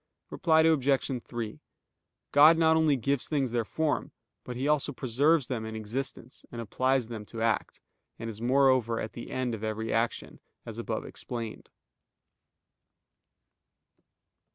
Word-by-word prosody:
Reply 160 Hz, -2 st, +3 dB
Obj. 140 Hz, -5 st, +2 dB
3: 115 Hz, -8 st, -5 dB, 0.7 s
God 155 Hz, +3 st, +7 dB
not 160 Hz, -1 st, +4 dB
only 160 Hz, -3 st, +4 dB
gives 135 Hz, +1 st, 0 dB
things 140 Hz, -5 st, 0 dB
their 120 Hz, -1 st, 0 dB
form, 155 Hz, +7 st, -1 dB, 0.3 s
but 125 Hz, -, -6 dB
He 130 Hz, +3 st, -2 dB
also 150 Hz, -2 st, +2 dB
preserves 140 Hz, +4 st, +2 dB
them 120 Hz, -3 st, -3 dB
in 110 Hz, 0 st, -6 dB
existence, 115 Hz, +3 st, -5 dB
and 120 Hz, -, -7 dB
applies 130 Hz, +2 st, 0 dB
them 115 Hz, -2 st, -6 dB
to 115 Hz, -1 st, -4 dB
act, 115 Hz, -1 st, -1 dB, 0.4 s
and 115 Hz, -, -6 dB
is 110 Hz, -1 st, -7 dB
moreover 130 Hz, -3 st, +3 dB
the 120 Hz, +1 st, -9 dB
end 130 Hz, -2 st, -2 dB
of 110 Hz, -1 st, -6 dB
every 110 Hz, +1 st, -2 dB
action, 115 Hz, +1 st, -1 dB, 0.3 s
as -, -, -7 dB
above -, -, -3 dB
explained. 115 Hz, -3 st, -6 dB
125 Hz, 135 wpm, -29 LUFS, 115-140 Hz, 0.7 s, God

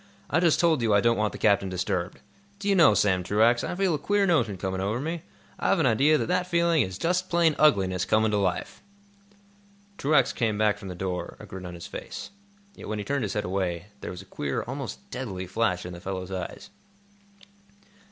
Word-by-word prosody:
I 160 Hz, -, +3 dB
just 170 Hz, -3 st, +3 dB
told 165 Hz, -6 st, +3 dB
you 110 Hz, -3 st, +3 dB
I -, -, +6 dB
don't 115 Hz, +2 st, +3 dB
want 105 Hz, -1 st, 0 dB
the -, -, -8 dB
captain 100 Hz, -2 st, +2 dB
disturbed. 90 Hz, 0 st, -3 dB, 0.4 s
Do 200 Hz, 0 st, -6 dB
you 200 Hz, -, +4 dB
know, 165 Hz, -, +6 dB
Sam 95 Hz, -3 st, +2 dB
Truax, 110 Hz, +5 st, +3 dB
I -, -, -3 dB
feel 190 Hz, -2 st, +1 dB
a 150 Hz, -, -1 dB
queer 205 Hz, +6 st, +2 dB
notion 120 Hz, -, +1 dB
coming 95 Hz, 0 st, -3 dB
over 105 Hz, +5 st, -1 dB
me? 165 Hz, +4 st, -3 dB, 0.4 s
I've -, -, +2 dB
an 165 Hz, -, +2 dB
idea 135 Hz, +6 st, +4 dB
that -, -, -1 dB
that 180 Hz, +1 st, 0 dB
feeling 170 Hz, -2 st, +3 dB
is 95 Hz, 0 st, -3 dB
just 180 Hz, -, 0 dB
plain 170 Hz, -3 st, +3 dB
ugliness 95 Hz, -11 st, +3 dB
coming 110 Hz, 0 st, +2 dB
to 105 Hz, -, +1 dB
life!" 95 Hz, -3 st, -2 dB, 1.2 s
Truax 140 Hz, -2 st, +3 dB
came 110 Hz, -4 st, 0 dB
back 105 Hz, -1 st, +2 dB
from 100 Hz, -, -9 dB
the 90 Hz, -, -6 dB
door, 90 Hz, 0 st, -4 dB
a -, -, -10 dB
grin 95 Hz, -1 st, -8 dB
on 90 Hz, -, -8 dB
his 85 Hz, -, -9 dB
face. -, -, -7 dB, 0.4 s
Yet, -, -, -10 dB
when 110 Hz, -, -3 dB
he 105 Hz, -, -4 dB
turned 140 Hz, -1 st, -1 dB
his 105 Hz, -4 st, -2 dB
head 105 Hz, -, -2 dB
away, 90 Hz, 0 st, -2 dB
there -, -, -6 dB
was 90 Hz, +1 st, -7 dB
a -, -, -20 dB
queer, 70 Hz, -7 st, -3 dB
almost 135 Hz, +9 st, -6 dB
deadly 100 Hz, -8 st, -4 dB
flash 90 Hz, -2 st, -1 dB
in 90 Hz, -, -6 dB
the 85 Hz, -, -9 dB
fellow's 95 Hz, 0 st, -5 dB
eyes. 95 Hz, -1 st, -6 dB
110 Hz, 215 wpm, -26 LUFS, 95-155 Hz, 1.2 s, I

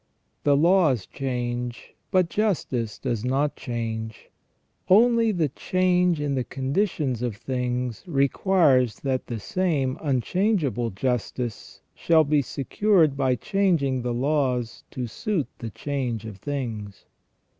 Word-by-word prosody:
The 145 Hz, -1 st, +4 dB
laws 160 Hz, -, +3 dB
change, 120 Hz, -2 st, -4 dB, 0.2 s
but 185 Hz, -3 st, +3 dB
justice 150 Hz, -, -1 dB
does 115 Hz, -2 st, -2 dB
not 135 Hz, +4 st, 0 dB
change; 110 Hz, -2 st, -5 dB, 0.6 s
only 230 Hz, +3 st, +5 dB
the 165 Hz, -7 st, 0 dB
change 180 Hz, +2 st, +1 dB
in 145 Hz, -1 st, -1 dB
the 130 Hz, -2 st, 0 dB
conditions 135 Hz, -, -1 dB
of 120 Hz, -4 st, -2 dB
things 125 Hz, 0 st, -3 dB
requires 140 Hz, -, +3 dB
that 130 Hz, -2 st, -1 dB
the 115 Hz, -2 st, -4 dB
same 145 Hz, -, -1 dB
unchangeable 140 Hz, -, 0 dB
justice 120 Hz, +2 st, -3 dB
shall 160 Hz, -2 st, +3 dB
be 150 Hz, 0 st, +2 dB
secured 155 Hz, -, +2 dB
by 130 Hz, -2 st, +2 dB
changing 155 Hz, -7 st, +1 dB
the 120 Hz, 0 st, -2 dB
laws 125 Hz, -2 st, 0 dB
to 125 Hz, -, -4 dB
suit 165 Hz, -, -2 dB
the 115 Hz, -, -5 dB
change 125 Hz, -3 st, -3 dB
of 110 Hz, -3 st, -8 dB
things. 115 Hz, -6 st, -5 dB
135 Hz, 120 wpm, -25 LUFS, 120-165 Hz, 0.6 s, only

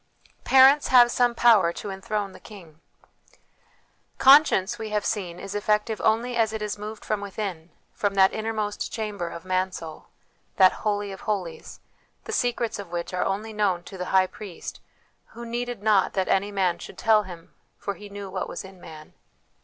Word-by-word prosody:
1 -, -, -38 dB
Parents 270 Hz, +2 st, +6 dB
have 245 Hz, -2 st, +6 dB
some 245 Hz, -1 st, +2 dB
Power 225 Hz, -8 st, +5 dB
to 200 Hz, -, -6 dB
Enthrone 205 Hz, 0 st, -3 dB
the -, -, -14 dB
King. 170 Hz, -7 st, -14 dB, 1.4 s
Conscience, 265 Hz, -7 st, +5 dB
we 220 Hz, -1 st, -5 dB
have 210 Hz, -1 st, -1 dB
seen, 185 Hz, -6 st, -3 dB
is 195 Hz, -, -7 dB
effective 210 Hz, +1 st, 0 dB
only 235 Hz, +3 st, +1 dB
as 225 Hz, -2 st, +1 dB
it 220 Hz, -, -4 dB
is 210 Hz, -1 st, -3 dB
moved 210 Hz, +1 st, -8 dB
from 215 Hz, -2 st, -1 dB
within, 195 Hz, -5 st, -5 dB, 0.2 s
from 200 Hz, -1 st, -1 dB
that 190 Hz, -1 st, +5 dB
innermost 215 Hz, -1 st, -3 dB
chamber 210 Hz, -6 st, -4 dB
of 170 Hz, +1 st, -9 dB
Mansoul, 185 Hz, -3 st, -3 dB, 0.5 s
that 185 Hz, -1 st, +6 dB
Holy 205 Hz, -1 st, -2 dB
of 190 Hz, -, -9 dB
Holies, 190 Hz, -6 st, -4 dB, 0.4 s
the -, -, -7 dB
secrets 240 Hz, -, -1 dB
of 200 Hz, -4 st, -8 dB
which 175 Hz, +1 st, -4 dB
are 180 Hz, -, 0 dB
only 210 Hz, +3 st, -3 dB
known 195 Hz, -5 st, 0 dB
to 195 Hz, -, -11 dB
the 180 Hz, -, -3 dB
High 190 Hz, 0 st, +3 dB
Priest, 205 Hz, -2 st, -9 dB, 0.6 s
who 235 Hz, -, -8 dB
c< 235 Hz, -, -8 dB
needed 240 Hz, -3 st, -4 dB
not 210 Hz, -3 st, +3 dB
that 190 Hz, -1 st, 0 dB
any 200 Hz, +2 st, +1 dB
man 185 Hz, -3 st, 0 dB
should -, -, -10 dB
tell 220 Hz, -2 st, +4 dB
Him, 175 Hz, -4 st, -11 dB, 0.2 s
for 200 Hz, -, -4 dB
He 205 Hz, +1 st, -12 dB
knew 200 Hz, 0 st, -7 dB
what 190 Hz, 0 st, -4 dB
was -, -, -6 dB
in 190 Hz, -1 st, -13 dB
man." 155 Hz, -2 st, -12 dB
205 Hz, 185 wpm, -25 LUFS, 190-220 Hz, 1.4 s, Parents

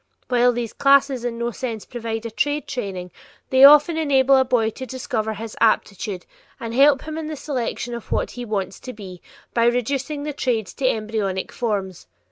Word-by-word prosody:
While 245 Hz, 0 st, +4 dB
these 235 Hz, -2 st, -4 dB
classes 275 Hz, -2 st, +3 dB
in 240 Hz, -1 st, -3 dB
no 235 Hz, 0 st, -2 dB
sense 230 Hz, -3 st, -5 dB
provide 230 Hz, -2 st, -5 dB
a 230 Hz, -, -4 dB
trade 290 Hz, +6 st, -1 dB
training, 195 Hz, -9 st, -5 dB, 0.4 s
they 260 Hz, 0 st, +5 dB
often 300 Hz, +3 st, +8 dB
enable 275 Hz, -3 st, +4 dB
a 265 Hz, -, +5 dB
boy 240 Hz, -3 st, +1 dB
to 260 Hz, +4 st, -8 dB
discover 220 Hz, -3 st, -3 dB
his 220 Hz, +1 st, -7 dB
aptitude 205 Hz, -4 st, 0 dB, 0.3 s
and 230 Hz, -1 st, -5 dB
help 275 Hz, +2 st, +5 dB
him 315 Hz, 0 st, -5 dB
in 315 Hz, -, -5 dB
the 310 Hz, -, -4 dB
selection 255 Hz, -4 st, -4 dB
of 235 Hz, -2 st, -8 dB
what -, -, 0 dB
he 245 Hz, -, -7 dB
"wants 200 Hz, -4 st, -3 dB
to 255 Hz, -, -8 dB
be" 190 Hz, -4 st, -10 dB, 0.3 s
by 230 Hz, -1 st, +2 dB
reducing 275 Hz, +4 st, -1 dB
the 300 Hz, 0 st, -4 dB
trades 235 Hz, -7 st, -2 dB
to 265 Hz, -, -1 dB
embryonic 215 Hz, -4 st, -2 dB
forms. 195 Hz, -, -3 dB
240 Hz, 185 wpm, -22 LUFS, 220-270 Hz, 0.4 s, often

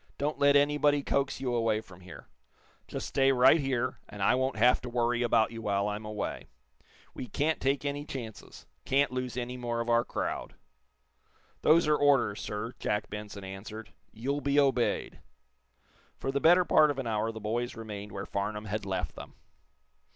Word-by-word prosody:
"Don't 150 Hz, +2 st, -2 dB
let 140 Hz, 0 st, +5 dB
anybody 145 Hz, 0 st, +3 dB
coax 140 Hz, -1 st, 0 dB
you 130 Hz, -2 st, -2 dB
away 115 Hz, -2 st, +1 dB
from 95 Hz, -5 st, -14 dB
here. 90 Hz, 0 st, -12 dB, 0.6 s
Just -, -, -5 dB
stay 135 Hz, 0 st, +3 dB
right 130 Hz, +5 st, +6 dB
here, 130 Hz, -3 st, -1 dB
and 100 Hz, -1 st, -5 dB
I -, -, +4 dB
won't 130 Hz, +1 st, 0 dB
have 120 Hz, +3 st, +4 dB
to 125 Hz, -, -6 dB
worry 120 Hz, 0 st, 0 dB
about 115 Hz, -2 st, +3 dB
you 115 Hz, -1 st, -7 dB
while 100 Hz, -2 st, 0 dB
I'm 105 Hz, +1 st, -4 dB
away. 105 Hz, -1 st, -4 dB, 0.7 s
We 125 Hz, -, -6 dB
can't 155 Hz, +5 st, -1 dB
take 140 Hz, +2 st, 0 dB
any 145 Hz, 0 st, -2 dB
chances 120 Hz, -7 st, -8 dB, 0.2 s
can't 140 Hz, 0 st, +2 dB
lose 125 Hz, -1 st, -4 dB
any 125 Hz, 0 st, -4 dB
more 120 Hz, -1 st, -3 dB
of 115 Hz, 0 st, -2 dB
our 120 Hz, 0 st, +4 dB
crowd." -, -, -4 dB, 1.1 s
"Those 165 Hz, +2 st, +5 dB
are 150 Hz, -, +4 dB
orders, 140 Hz, -8 st, +3 dB
sir," 105 Hz, +4 st, -4 dB
Jack 105 Hz, 0 st, -2 dB
Benson 105 Hz, -1 st, -7 dB
answered. 100 Hz, +3 st, -8 dB, 0.2 s
"You'll 140 Hz, +6 st, -3 dB
be 140 Hz, 0 st, +2 dB
obeyed." 135 Hz, -4 st, +1 dB, 1.0 s
For 135 Hz, -, -3 dB
the 140 Hz, 0 st, -1 dB
better 175 Hz, +2 st, +6 dB
part 155 Hz, -2 st, +5 dB
of 145 Hz, -, -2 dB
an 135 Hz, -, -3 dB
hour 110 Hz, 0 st, -1 dB
the 110 Hz, -, -8 dB
boys 115 Hz, +3 st, -2 dB
remained 105 Hz, -2 st, -7 dB
where 100 Hz, -, -5 dB
Farnum 105 Hz, +2 st, -3 dB
had 105 Hz, -1 st, -4 dB
left 90 Hz, -6 st, -2 dB
them. -, -, -10 dB
120 Hz, 180 wpm, -29 LUFS, 105-140 Hz, 1.1 s, right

